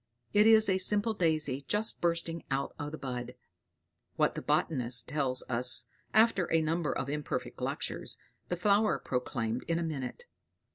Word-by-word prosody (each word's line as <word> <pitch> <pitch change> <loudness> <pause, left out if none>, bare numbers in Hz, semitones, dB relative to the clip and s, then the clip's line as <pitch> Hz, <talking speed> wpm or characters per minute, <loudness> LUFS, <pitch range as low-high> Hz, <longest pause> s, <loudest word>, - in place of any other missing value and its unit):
It 210 +1 +6
is 220 -1 +6
a 190 -1 +2
simple 205 +3 +2
daisy, 155 -7 +1
just 210 +2 0
bursting 170 -1 0
out 135 +1 -1
of 145 0 -4
the 155 - -6
bud. 125 -2 -5 0.8
What - - +2
the - - -5
botanist 125 -5 +1
tells 135 -3 0
us 120 0 +2 0.3
after 220 -5 +3
a 165 - +4
number 160 0 0
of 135 - -3
imperfect 150 +1 -4
lectures, - - -3 0.3
the 175 - -2
flower 205 +4 +3
proclaimed 125 -2 -2
in 165 - +1
a 170 - -1
minute. 155 - -5
155 Hz, 155 wpm, -31 LUFS, 130-185 Hz, 0.8 s, It